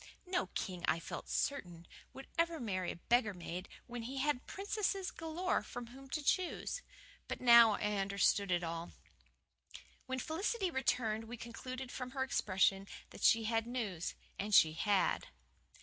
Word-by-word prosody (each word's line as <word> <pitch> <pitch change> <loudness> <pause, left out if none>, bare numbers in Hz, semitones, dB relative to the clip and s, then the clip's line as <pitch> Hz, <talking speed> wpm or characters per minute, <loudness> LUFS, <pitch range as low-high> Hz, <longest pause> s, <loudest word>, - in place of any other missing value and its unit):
No 365 0 0
king, 180 -3 -3
I 165 - +3
felt - - -7
certain, 175 - -2 0.3
would 270 - -10
ever 335 -1 +1
marry 185 -6 -2
a - - -7
beggar 220 +2 +2
maid 180 +1 -6 0.2
when 245 -1 -6
he 255 +4 -5
had 275 -1 0
princesses 395 -1 -1
galore 325 +3 -1
from 245 0 -7
whom 265 +3 -13
to 305 +2 -2
choose. 370 - 0 0.5
But - - -4
now 235 -3 +8
I 210 0 -1
understood 200 0 +2
it 175 0 +2
all. 165 0 -4 1.1
When 260 0 -2
Felicity 370 - -1
returned 230 -5 0
we 240 +2 -7
concluded 255 +2 -6
from 255 -1 -5
her 265 - +2
expression 195 -5 +2 0.2
that - - -11
she 225 0 +5
had 225 +1 0
news. 215 -9 -3 0.2
And 205 0 +1
she 155 -1 +7
had. 200 +4 +1
235 Hz, 155 wpm, -35 LUFS, 195-270 Hz, 1.1 s, now